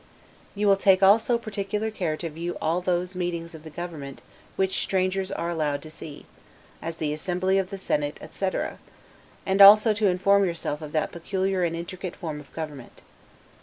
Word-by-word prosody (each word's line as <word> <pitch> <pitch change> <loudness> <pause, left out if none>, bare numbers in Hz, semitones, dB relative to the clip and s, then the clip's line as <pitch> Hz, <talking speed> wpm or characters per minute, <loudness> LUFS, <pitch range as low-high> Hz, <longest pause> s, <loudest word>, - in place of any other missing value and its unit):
You 205 +1 -1
will 200 -1 +5
take 195 -1 +4
also 220 +5 +5
particular 210 0 -3
care 175 -7 -2
to 170 - -4
view 170 +3 -5
all 165 +3 0
those 180 0 -1
meetings 170 -2 -3
of 160 -1 -11
the 160 - -9
government, 150 -4 -7 0.3
which 190 0 0
strangers 190 0 0
are 170 +1 -2
allowed 150 -4 -1
to 155 - -9
see; 150 -2 -10 0.6
as 165 0 -4
the 150 -2 -2
Assembly 185 +4 0
of 190 -1 -2
the 195 - -6
Senate, 150 -5 -1
etc., 190 -1 -3 0.7
and 195 +1 +2
also 210 +2 +9
to 210 0 +1
inform 195 +2 +3
yourself 165 -4 -2
of 150 -1 -7
that 155 - 0
peculiar 190 +2 -1
and 165 -1 0
intricate 175 +2 -6
form 155 -3 -5
of 145 - -14
government. 150 -6 -8
180 Hz, 175 wpm, -25 LUFS, 160-195 Hz, 0.7 s, also